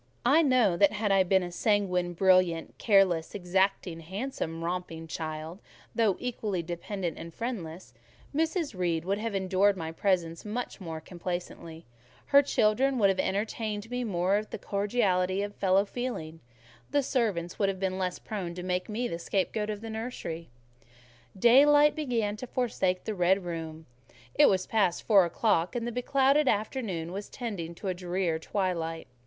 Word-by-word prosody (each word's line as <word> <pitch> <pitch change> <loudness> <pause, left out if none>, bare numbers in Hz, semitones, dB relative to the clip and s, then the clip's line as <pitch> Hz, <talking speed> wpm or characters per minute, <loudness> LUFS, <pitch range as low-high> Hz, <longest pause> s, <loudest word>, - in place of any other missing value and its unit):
I 285 +7 +6
know 250 - +3
that 200 +3 +4
had 210 -1 0
I 195 -1 +5
been 190 0 +3
a 175 - -5
sanguine, 180 -3 +1
brilliant, 185 -2 +2
careless, 195 -5 +3
exacting, 190 -2 0
handsome, 170 -2 -4
romping 170 -2 -4
child—though 160 +7 -3
equally 215 -7 -3
dependent 175 +1 -4
and 165 - -8
friendless—Mrs. 250 - -4
Reed 170 -3 -1
would 200 +2 0
have 225 -1 -3
endured 195 +1 +2
my 160 -2 -4
presence 170 -2 0
more 205 -7 -5
complacently; 175 -1 -6 0.5
her 280 - +9
children 260 0 +2
would 200 -4 +4
have 190 - 0
entertained 210 +1 -2
for 225 - -16
me 250 0 -1
more 190 -2 +1
of 215 +1 -4
the - - -5
cordiality 200 -2 0
of 205 0 -5
fellow 195 +1 +2
feeling; 200 -9 -5 0.5
the 285 - +2
servants 205 -11 -1
would 200 -2 +3
have 190 -1 -3
been 190 -1 -1
less 180 -1 -1
prone 185 -5 -5
to 180 - -6
make 180 +1 -2
me 235 +3 -1
the 170 - -5
scapegoat 205 +4 -1
of 210 -1 -4
the 225 - -7
nursery. 220 -8 -5 0.9
Daylight 290 +7 +6
began 235 -9 -1
to 255 - -7
forsake 190 -8 -1
the 220 - -3
red 185 0 +2
room; 160 -2 -6 0.5
it 290 - +6
was 185 -1 +1
past 200 -6 +1
four 200 -5 +5
o'clock, 175 0 +1
and 235 -1 -2
the 240 - -2
beclouded 275 +4 +2
afternoon 205 -7 -1
was 200 +2 -6
tending 190 -9 -5
to 190 +1 -3
drear 180 -2 -1
twilight. 165 -3 -2
195 Hz, 155 wpm, -29 LUFS, 175-225 Hz, 0.9 s, her